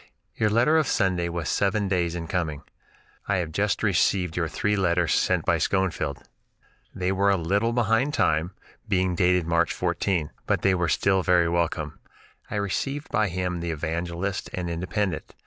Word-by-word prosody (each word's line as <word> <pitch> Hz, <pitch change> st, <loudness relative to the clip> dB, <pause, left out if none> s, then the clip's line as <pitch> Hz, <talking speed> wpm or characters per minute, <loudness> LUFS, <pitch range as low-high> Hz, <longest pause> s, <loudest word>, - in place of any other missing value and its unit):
Your 110 Hz, -, +1 dB
letter 120 Hz, +9 st, +3 dB
of 155 Hz, -, 0 dB
Sunday 90 Hz, -4 st, +1 dB
was 85 Hz, -2 st, -3 dB
seven 100 Hz, +1 st, +1 dB
days 90 Hz, -3 st, 0 dB
in 85 Hz, -1 st, -4 dB
coming. 80 Hz, -4 st, -2 dB, 0.6 s
I 100 Hz, -, +1 dB
have 85 Hz, -4 st, -2 dB
just 100 Hz, +6 st, 0 dB
received 90 Hz, -3 st, +2 dB
your 85 Hz, -2 st, 0 dB
three 105 Hz, +6 st, 0 dB
letters 85 Hz, -4 st, +1 dB
sent -, -, +1 dB
by -, -, +2 dB
Schoenfield. 90 Hz, -8 st, -1 dB, 0.7 s
They 90 Hz, 0 st, -1 dB
were 100 Hz, +1 st, +2 dB
a 100 Hz, -, +3 dB
little 100 Hz, +7 st, +1 dB
behind 120 Hz, +4 st, +1 dB
time, 80 Hz, +4 st, +1 dB, 0.3 s
being 95 Hz, -1 st, +1 dB
dated 90 Hz, 0 st, +2 dB
March 85 Hz, +1 st, +2 dB
14! 90 Hz, -7 st, -1 dB, 0.2 s
but -, -, 0 dB
they 95 Hz, -, +4 dB
were 90 Hz, -2 st, 0 dB
still 95 Hz, -1 st, +2 dB
very 90 Hz, -2 st, +3 dB
welcome. 85 Hz, -3 st, -1 dB, 0.5 s
I -, -, -4 dB
received 135 Hz, +8 st, -2 dB
by 110 Hz, -, +2 dB
him 90 Hz, -1 st, -2 dB
the 85 Hz, 0 st, -3 dB
'Evangelist' 85 Hz, +4 st, -3 dB
and 90 Hz, -2 st, -3 dB
'Independent.' 90 Hz, +1 st, -3 dB
90 Hz, 165 wpm, -25 LUFS, 85-100 Hz, 0.7 s, they